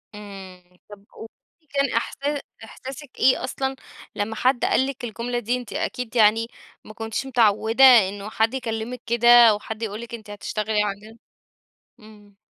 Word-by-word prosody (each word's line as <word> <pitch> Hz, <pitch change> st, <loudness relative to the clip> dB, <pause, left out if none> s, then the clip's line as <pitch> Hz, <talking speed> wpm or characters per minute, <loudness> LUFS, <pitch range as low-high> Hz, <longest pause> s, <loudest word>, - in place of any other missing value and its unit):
إمم. 195 Hz, -3 st, -11 dB, 0.3 s
طَب 205 Hz, -1 st, -13 dB
قولي 225 Hz, -, -10 dB, 0.3 s
لي 310 Hz, -, -37 dB
كان 275 Hz, -2 st, 0 dB
إحسا 285 Hz, +5 st, -2 dB, 0.2 s
إحساسِك 265 Hz, +4 st, -10 dB
إيه 255 Hz, -, +3 dB
أصلًا 265 Hz, +1 st, -3 dB, 0.4 s
لما 215 Hz, +2 st, -3 dB
حد 250 Hz, +2 st, +1 dB
قال 265 Hz, -, +2 dB
لِك 275 Hz, -2 st, -7 dB
الجملة 240 Hz, +1 st, -3 dB
دي، 240 Hz, +2 st, -1 dB
أنتِ 245 Hz, -3 st, -9 dB
أكيد 250 Hz, -1 st, -4 dB
يعني 225 Hz, +1 st, +4 dB, 0.4 s
ما 215 Hz, -, -11 dB
كنتيش 225 Hz, +4 st, -4 dB
متعودة 225 Hz, -1 st, +2 dB
إنه 205 Hz, -5 st, +5 dB
حد 225 Hz, +3 st, 0 dB
يكلمِك 240 Hz, -1 st, -4 dB
كده 235 Hz, 0 st, 0 dB, 0.2 s
أو 210 Hz, -1 st, +1 dB
حد 220 Hz, +1 st, -7 dB
يقول 215 Hz, +1 st, -4 dB
لِك 235 Hz, 0 st, -10 dB
أنتِ 220 Hz, -3 st, -9 dB
هتشتغلي 210 Hz, +1 st, -2 dB
عندنا؟ 210 Hz, +2 st, -6 dB, 0.8 s
إمم. 210 Hz, -2 st, -18 dB
225 Hz, 160 wpm, -23 LUFS, 210-250 Hz, 0.8 s, إنه